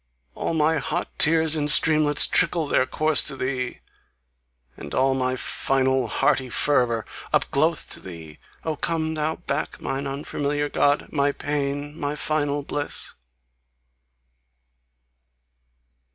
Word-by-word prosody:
All 165 - -3
my 160 0 +2
hot - - -3
tears 160 0 +6
in 150 -1 -1
streamlets 150 0 +5
trickle 165 -3 +2
Their 130 -2 +1
course 155 +2 +3
to - - -3
thee! 130 -1 -4 0.9
And - - -8
all 135 +1 +2
my 130 -1 -1
final 130 0 0
hearty 130 +3 +1
fervour 120 -3 +1 0.3
Up - - +1
glow'th - - 0
to - - -5
THEE! 80 -4 -11 0.2
Oh, 160 -1 -2
come 160 0 -2
thou 155 0 -2
back, 155 -4 -4
Mine 140 +1 -4
unfamiliar 145 +1 -3
God! 145 0 +1
my 140 -1 +1
PAIN! 145 0 -3
My 145 0 -3
final 145 -2 -1
bliss! 145 +1 -4
145 Hz, 125 wpm, -23 LUFS, 135-155 Hz, 0.9 s, tears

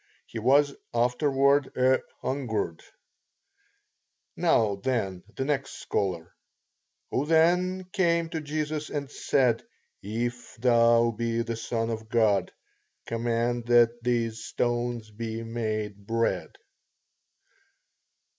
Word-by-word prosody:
He 115 - -6
was 140 +5 +4 0.2
afterward 135 +3 +2
"a 130 +1 +4 0.2
hungered." 110 - -2 1.5
Now, 105 -3 +2
then, 100 -5 -1
the 135 - -2
next 135 -1 -1
scholar. 90 -4 -2 0.8
Who 140 +3 0
then 180 +3 +3
came 170 -3 +2
to 160 -1 -3
Jesus 155 0 -3
and 140 -2 -4
said, 125 -6 +2 0.4
If 120 +4 -4
thou 115 -1 +4
be 115 +1 -1
the 115 0 -3
Son 115 0 -2
of 110 -1 -5
God, 105 -5 +2 0.5
command 115 +1 -1
that 120 0 +4
these 115 -2 0
stones 120 -2 -2
be 110 +1 -5
made 110 -3 -3
bread? 115 0 0
120 Hz, 100 wpm, -27 LUFS, 115-135 Hz, 1.5 s, was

